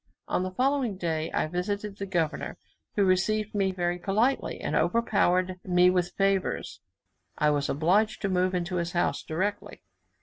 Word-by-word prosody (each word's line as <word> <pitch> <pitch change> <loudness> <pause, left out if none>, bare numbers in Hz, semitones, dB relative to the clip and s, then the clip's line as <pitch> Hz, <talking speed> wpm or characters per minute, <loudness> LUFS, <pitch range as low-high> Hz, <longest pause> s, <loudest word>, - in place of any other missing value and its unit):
On - - 0
the 185 - -2
following 255 0 0
day, 160 -3 -2
I - - 0
visited 200 +5 -3
the 200 - -5
governor, 165 -4 -2 0.4
who 200 - +3
received 210 +3 +1
me 195 -2 +1
very 175 -1 -1
politely, 220 +9 0
and - - -2
overpowered 185 -5 +2
me 180 0 +4
with 180 -1 0
favours, 195 -1 0 0.6
I 150 0 +3
was 145 -1 0
obliged 185 +9 +2
to - - +2
move 185 0 +1
into 180 +1 -2
his 170 0 -2
house 175 - 0
directly. 195 +6 -3
185 Hz, 160 wpm, -27 LUFS, 175-205 Hz, 0.6 s, me